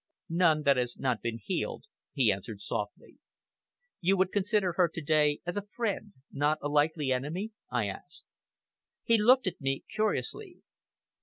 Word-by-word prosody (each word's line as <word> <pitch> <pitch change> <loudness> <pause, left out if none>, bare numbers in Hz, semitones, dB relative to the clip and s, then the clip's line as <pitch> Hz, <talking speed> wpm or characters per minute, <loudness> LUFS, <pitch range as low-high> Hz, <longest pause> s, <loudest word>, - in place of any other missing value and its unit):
"None 165 -3 +3
that 140 -2 +4
has 125 -1 -1
not 125 -4 -1
been 115 -1 -3
healed," 175 - -3 0.3
he - - +3
answered - - -5
softly. - - -5 0.8
"You 190 +2 +2
would 185 0 +2
consider 205 -2 +1
her 175 -1 +3
to 170 - -4
day 150 -1 +3
as 175 - -3
a 205 - -1
friend 210 -2 -3 0.2
not 145 +2 +1
a 145 - -1
likely 150 -1 +2
enemy?" 155 - -2 0.2
I 120 -3 0
asked. 100 -1 -8 0.8
He 230 -1 +4
looked 255 +4 +6
at 185 - -3
me 135 0 -1
curiously. 350 - -2
165 Hz, 155 wpm, -30 LUFS, 140-205 Hz, 0.8 s, looked